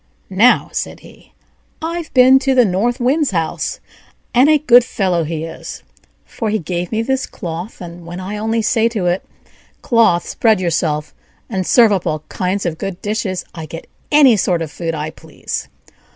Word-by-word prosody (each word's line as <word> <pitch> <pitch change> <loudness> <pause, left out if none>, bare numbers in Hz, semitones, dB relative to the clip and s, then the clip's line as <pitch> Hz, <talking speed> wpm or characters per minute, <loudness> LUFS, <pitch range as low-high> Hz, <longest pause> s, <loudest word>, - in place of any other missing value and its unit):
"Now," 230 +7 +4
said - - -4
he, - - -17 0.5
"I've 330 0 -4
been 260 +1 +7
to 270 -1 +1
the 250 -2 +6
North 220 +7 0
Wind's 280 +4 +2
house, 165 -4 -2 0.5
and 255 +5 +5
a 310 - +6
good 250 -5 +6
fellow 185 -7 0
he 160 0 -4
is, 165 - -8 0.4
for 225 - -4
he 215 - +1
gave 175 -1 -4
me 225 0 0
this 265 +2 -1
cloth, 175 +5 -7
and 175 0 -9
when 175 +2 -7
I 195 +3 -5
only 225 +1 -1
say 225 +1 +2
to 215 -6 -3
it, 175 +1 0 0.6
'Cloth, 230 -8 +3
spread 220 -4 +2
yourself, 160 -4 -1 0.4
and 185 -2 -2
serve 230 -3 +5
up 190 -3 0
all 155 -1 -2
kinds 185 +2 -2
of 160 -2 -3
good 195 -2 -5
dishes,' 205 -3 -2
I 160 -3 -7
get 165 +2 -8 0.3
any 285 -5 +6
sort 175 -3 +1
of 155 - -7
food 165 0 -4
I 155 +1 -4
please." - - -7
195 Hz, 180 wpm, -17 LUFS, 170-240 Hz, 0.6 s, been